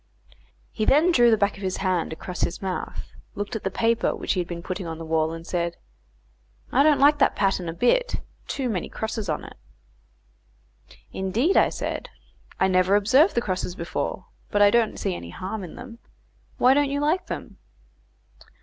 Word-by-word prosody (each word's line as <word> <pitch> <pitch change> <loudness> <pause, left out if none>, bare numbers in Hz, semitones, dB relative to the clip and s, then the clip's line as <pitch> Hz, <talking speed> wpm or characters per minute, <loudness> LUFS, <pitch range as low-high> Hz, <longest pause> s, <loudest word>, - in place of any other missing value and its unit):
He - - -3
then 305 +10 +4
drew 240 -7 +5
the 220 - +4
back 200 0 0
of - - -11
his 190 -1 -2
hand 185 -3 0
across 180 +3 -6
his 175 - -1
mouth, 190 -2 -5 0.2
looked 205 +3 -4
at 220 - -4
the 190 - 0
paper 230 +4 +1
which - - -1
he 185 - -1
had 175 - -2
been 170 -1 -6
putting 185 -1 -4
on 165 -1 -5
the 165 - -7
wall, 160 0 +1
and 165 0 -8
said, 170 -1 -2 0.9
"I 265 - +4
don't 295 0 +5
like 290 +1 +5
that 275 - +3
pattern 195 -4 0
a - - -4
bit; - - +2 0.3
too 265 -2 -2
many 200 -7 -2
crosses 220 -3 -4
on 155 - -2
it." - - -11 1.6
"Indeed," 215 - +1
I - - +5
said, - - -4 0.5
"I 190 - +4
never 185 +1 +3
observed 260 - +4
the 235 - +2
crosses 185 -3 -3
before, 170 - -4 0.2
but 205 - 0
I 205 - +6
don't 230 -1 +2
see - - -2
any 85 -1 -7
harm 190 - -5
in 175 - -9
them. 235 -2 -10 0.6
Why 255 +1 +5
don't 285 0 +2
you 280 +1 -1
like 320 +5 0
them?" - - -7
200 Hz, 190 wpm, -24 LUFS, 180-245 Hz, 1.6 s, I